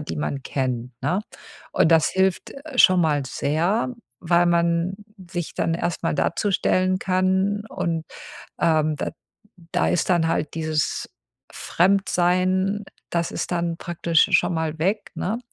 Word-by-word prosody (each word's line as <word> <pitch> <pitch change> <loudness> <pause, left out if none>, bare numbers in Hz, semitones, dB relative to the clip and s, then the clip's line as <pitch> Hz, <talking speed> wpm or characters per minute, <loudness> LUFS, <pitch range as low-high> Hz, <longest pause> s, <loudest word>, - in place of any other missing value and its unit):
die 150 - -5
man 140 -2 -3
kennt, 125 -2 -3
ne? 185 +3 +1 0.5
Und 160 - +3
das 160 -1 +5
hilft 190 -1 0 0.2
schon 185 -7 +6
mal 150 -3 +1
sehr, 170 - 0 0.3
weil 175 0 +2
man 170 +1 +1 0.4
sich 175 -2 -4
dann 165 - 0
erst 170 0 -2
mal - - 0
dazustellen 185 -1 +1
kann 190 +2 +1
und, 165 -2 -2 0.5
ähm, 155 -2 +2
da - - -3 0.6
da 80 - +2
ist 85 - 0
dann 170 -2 +3
halt 160 -2 -1
dieses 155 -2 -1 0.4
Fremdsein, 185 +1 +1 0.3
das 170 -1 -1
ist - - -4
dann 170 -1 -1
praktisch 170 -2 +1
schon - - +3
mal 160 -1 -2
weg, 200 +5 -1
ne. 215 +6 -2
170 Hz, 135 wpm, -23 LUFS, 160-185 Hz, 0.6 s, schon